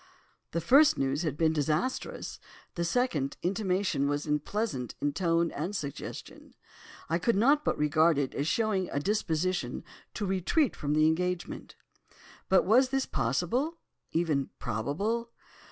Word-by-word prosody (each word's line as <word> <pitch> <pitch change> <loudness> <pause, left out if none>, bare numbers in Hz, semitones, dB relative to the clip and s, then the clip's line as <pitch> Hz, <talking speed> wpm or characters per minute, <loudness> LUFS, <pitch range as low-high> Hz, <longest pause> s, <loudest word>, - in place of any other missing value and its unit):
"The 170 - -2
first 280 - +6
news 135 +2 0
had 155 -4 -2
been 160 -1 +3
disastrous; 155 - -2 0.3
the 170 - -2
second 170 - 0
intimation 185 -6 0
was 145 0 -1
unpleasant 150 - -2
in 145 0 0
tone 170 0 +1
and 175 +8 -4
suggestion. 140 -7 -7 0.5
I 165 +2 0
could 235 +5 +1
not 280 +9 +4
but - - 0
regard 155 +1 +3
it 140 -2 -1
as 145 - -2
showing 195 +1 0
a 140 - -1
disposition 185 -1 -1 0.3
to 210 - -2
retreat 195 - +1
from 145 0 -1
the 155 0 +4
engagement. 180 +2 -1 0.7
But 190 - +4
was 250 +7 +5
this 270 0 0
possible—even 170 - -2
probable? 200 - -2
170 Hz, 135 wpm, -29 LUFS, 150-215 Hz, 0.7 s, first